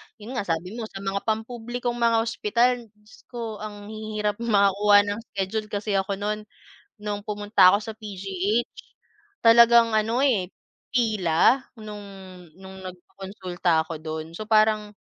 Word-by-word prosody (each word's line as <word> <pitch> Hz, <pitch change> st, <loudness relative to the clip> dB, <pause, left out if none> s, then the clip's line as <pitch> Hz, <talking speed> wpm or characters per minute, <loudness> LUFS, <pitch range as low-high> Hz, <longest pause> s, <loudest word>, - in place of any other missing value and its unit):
Yun 220 Hz, +2 st, -10 dB
nga, 200 Hz, -, -4 dB
sabi 170 Hz, +3 st, -2 dB
mo, 220 Hz, -, -4 dB
sa 195 Hz, -1 st, -9 dB
mga 195 Hz, +2 st, -3 dB
pampublikong 240 Hz, +2 st, -3 dB
mga 230 Hz, -1 st, +3 dB
ospital, 235 Hz, +1 st, 0 dB
Diyos 210 Hz, 0 st, -20 dB
ko, 230 Hz, -4 st, -6 dB
ang 210 Hz, 0 st, -8 dB
hihirap 215 Hz, -1 st, -3 dB
makakuha 205 Hz, -2 st, +4 dB
ng 205 Hz, -, -4 dB, 0.2 s
schedule 210 Hz, +3 st, -2 dB
kasi 205 Hz, 0 st, -3 dB
ako 195 Hz, +1 st, -2 dB
no'n, 210 Hz, +2 st, -2 dB, 0.6 s
nung 205 Hz, -1 st, -4 dB
pumunta 205 Hz, -3 st, +4 dB
ako 205 Hz, -, +2 dB
sa 220 Hz, +1 st, -6 dB
PGH, 200 Hz, +1 st, -2 dB, 0.7 s
talagang, 235 Hz, 0 st, +7 dB
ano, 225 Hz, +4 st, +1 dB
eh, 200 Hz, -9 st, +1 dB, 0.4 s
pila, 215 Hz, 0 st, +3 dB, 0.2 s
nung 210 Hz, -1 st, -8 dB, 0.6 s
nung 190 Hz, 0 st, -11 dB
nagpakonsulta 180 Hz, -2 st, -3 dB
ako 160 Hz, -1 st, -7 dB
do'n. 160 Hz, 0 st, -6 dB
So 215 Hz, +3 st, -7 dB
parang 215 Hz, -1 st, +2 dB
210 Hz, 140 wpm, -25 LUFS, 195-225 Hz, 0.7 s, talagang